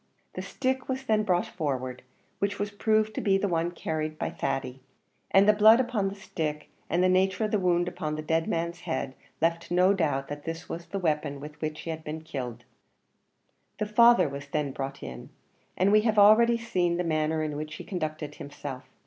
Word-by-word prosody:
The -, -, -4 dB
stick 260 Hz, 0 st, -2 dB
was 260 Hz, 0 st, -2 dB
then 220 Hz, -4 st, +2 dB
brought 180 Hz, -4 st, +1 dB
forward, 130 Hz, -6 st, -3 dB, 0.4 s
which 200 Hz, 0 st, -1 dB
was 205 Hz, 0 st, -2 dB
proved 215 Hz, +1 st, +1 dB
to -, -, -3 dB
be 195 Hz, -1 st, +3 dB
the 200 Hz, -, 0 dB
one 165 Hz, -2 st, +1 dB
usually 175 Hz, -, -9 dB
carried 155 Hz, -1 st, -2 dB
by -, -, -2 dB
Thady; 130 Hz, -1 st, -3 dB, 0.5 s
and 195 Hz, +1 st, +5 dB
the 210 Hz, -, +7 dB
blood 215 Hz, +3 st, +7 dB
upon 240 Hz, -6 st, 0 dB
the 195 Hz, -, -8 dB
stick, 155 Hz, -7 st, -4 dB, 0.2 s
and 175 Hz, +2 st, +2 dB
the -, -, +5 dB
nature 190 Hz, +3 st, +2 dB
of 210 Hz, -, -3 dB
the 210 Hz, -, +2 dB
wound 175 Hz, -1 st, +2 dB
upon 155 Hz, -3 st, -3 dB
the 155 Hz, -, -5 dB
dead 160 Hz, +1 st, 0 dB
man's 170 Hz, +1 st, -2 dB
head, 130 Hz, -5 st, -3 dB, 0.3 s
left 170 Hz, +1 st, 0 dB
no 180 Hz, +2 st, +4 dB
doubt 145 Hz, -7 st, 0 dB
that 145 Hz, 0 st, -7 dB
this 165 Hz, 0 st, -5 dB
was 170 Hz, +1 st, -6 dB
the 200 Hz, -, -4 dB
weapon 150 Hz, -5 st, -1 dB
with 150 Hz, +1 st, -10 dB
which 155 Hz, -1 st, -3 dB
he 165 Hz, -, -4 dB
had 160 Hz, 0 st, -6 dB
been 155 Hz, +1 st, -5 dB
killed. 130 Hz, -7 st, -6 dB, 1.1 s
The 215 Hz, -, -1 dB
father 235 Hz, -1 st, +6 dB
was 140 Hz, 0 st, -7 dB
then 145 Hz, -1 st, -1 dB
brought 135 Hz, +1 st, -5 dB
in, 65 Hz, 0 st, -8 dB, 0.5 s
and 190 Hz, +2 st, +3 dB
we 215 Hz, 0 st, +6 dB
have 220 Hz, -1 st, +1 dB
already 225 Hz, +3 st, +7 dB
seen 180 Hz, -7 st, 0 dB
the 180 Hz, -, 0 dB
manner 155 Hz, -1 st, 0 dB
in 150 Hz, -1 st, -3 dB
which 155 Hz, +1 st, -5 dB
he -, -, -8 dB
conducted 155 Hz, -5 st, -4 dB
himself. 145 Hz, -2 st, -8 dB
170 Hz, 210 wpm, -28 LUFS, 150-200 Hz, 1.1 s, the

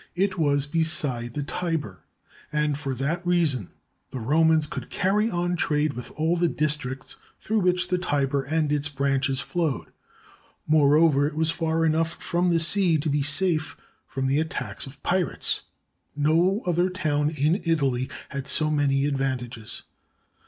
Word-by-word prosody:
It 190 Hz, +1 st, 0 dB
was 145 Hz, -4 st, +1 dB
beside 145 Hz, -7 st, 0 dB
the 145 Hz, -, -2 dB
Tiber, 155 Hz, -, -3 dB, 0.5 s
and 150 Hz, -1 st, 0 dB
for 140 Hz, -2 st, -4 dB
that 155 Hz, +7 st, -2 dB
reason 165 Hz, -, +1 dB, 0.4 s
the -, -, -6 dB
Romans 155 Hz, +5 st, +3 dB
could -, -, -7 dB
carry 205 Hz, +3 st, +1 dB
on 175 Hz, -1 st, -1 dB
trade 150 Hz, -3 st, 0 dB
with 125 Hz, -, -7 dB
all 160 Hz, +3 st, +1 dB
the 175 Hz, 0 st, +2 dB
districts 150 Hz, -5 st, -1 dB, 0.2 s
through 220 Hz, +1 st, 0 dB
which 180 Hz, -1 st, +1 dB
the 180 Hz, -, +1 dB
Tiber 140 Hz, -5 st, 0 dB
and 150 Hz, +2 st, -1 dB
its 145 Hz, 0 st, 0 dB
branches 135 Hz, -1 st, 0 dB
flowed. 165 Hz, -5 st, -2 dB, 0.8 s
Moreover, 150 Hz, -1 st, +4 dB
it 150 Hz, -, -6 dB
was 160 Hz, +1 st, +3 dB
far 165 Hz, 0 st, 0 dB
enough 160 Hz, +1 st, +1 dB
from 175 Hz, +1 st, 0 dB
the 165 Hz, -, +3 dB
sea 170 Hz, 0 st, +4 dB
to 150 Hz, 0 st, -2 dB
be 145 Hz, 0 st, +1 dB
safe 155 Hz, +3 st, +1 dB, 0.3 s
from 135 Hz, -1 st, -3 dB
the 135 Hz, +2 st, +2 dB
attacks 130 Hz, -8 st, -4 dB
of 135 Hz, +1 st, -12 dB
pirates. 180 Hz, -1 st, 0 dB, 0.5 s
No 165 Hz, -, +2 dB
other 175 Hz, +1 st, +1 dB
town 150 Hz, -5 st, 0 dB
in 155 Hz, +5 st, 0 dB
Italy 135 Hz, -6 st, 0 dB, 0.2 s
had 140 Hz, -1 st, -5 dB
so 155 Hz, +2 st, +2 dB
many 140 Hz, -2 st, +1 dB
advantages. 125 Hz, -5 st, -3 dB
150 Hz, 150 wpm, -25 LUFS, 140-170 Hz, 0.8 s, Moreover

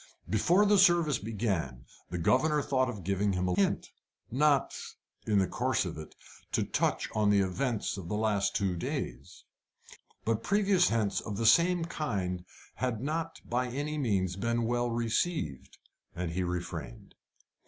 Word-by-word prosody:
Before 170 Hz, -, +3 dB
the 205 Hz, -1 st, +5 dB
service 170 Hz, -, +4 dB
began, 95 Hz, -, -2 dB, 0.2 s
the 90 Hz, -, -3 dB
governor 145 Hz, -, +2 dB
thought 130 Hz, -2 st, +1 dB
of 105 Hz, -6 st, -6 dB
giving 100 Hz, +2 st, 0 dB
him 90 Hz, 0 st, 0 dB
a 90 Hz, -, +1 dB
hint, 100 Hz, +2 st, 0 dB, 0.4 s
not 140 Hz, +2 st, +3 dB, 0.5 s
in 105 Hz, -2 st, +3 dB
the 95 Hz, -, +4 dB
course -, -, 0 dB
of -, -, -4 dB
it 75 Hz, -, -10 dB, 0.4 s
to -, -, +2 dB
touch -, -, 0 dB
on 105 Hz, -1 st, +2 dB
the 100 Hz, -1 st, +4 dB
events 110 Hz, +4 st, -1 dB
of 90 Hz, -3 st, -7 dB
the 105 Hz, -, -1 dB
last 105 Hz, -2 st, +1 dB
two 95 Hz, -3 st, 0 dB
days. 85 Hz, -, -5 dB, 0.8 s
But 115 Hz, -1 st, +1 dB
previous 200 Hz, -3 st, +3 dB
hints 110 Hz, -3 st, 0 dB
of 105 Hz, -3 st, -5 dB
the 115 Hz, -, -1 dB
same 170 Hz, +9 st, +5 dB
kind 95 Hz, -, -3 dB, 0.3 s
had 125 Hz, -4 st, -1 dB
not 160 Hz, +5 st, -3 dB
by 125 Hz, +1 st, 0 dB
any 145 Hz, +4 st, -3 dB
means 95 Hz, -8 st, 0 dB
been 115 Hz, +3 st, 0 dB
well 120 Hz, +1 st, 0 dB
received, 115 Hz, -, -2 dB, 0.4 s
and 90 Hz, -1 st, -3 dB
he 90 Hz, +3 st, -1 dB
refrained. 90 Hz, -9 st, -5 dB
115 Hz, 155 wpm, -30 LUFS, 95-145 Hz, 0.8 s, the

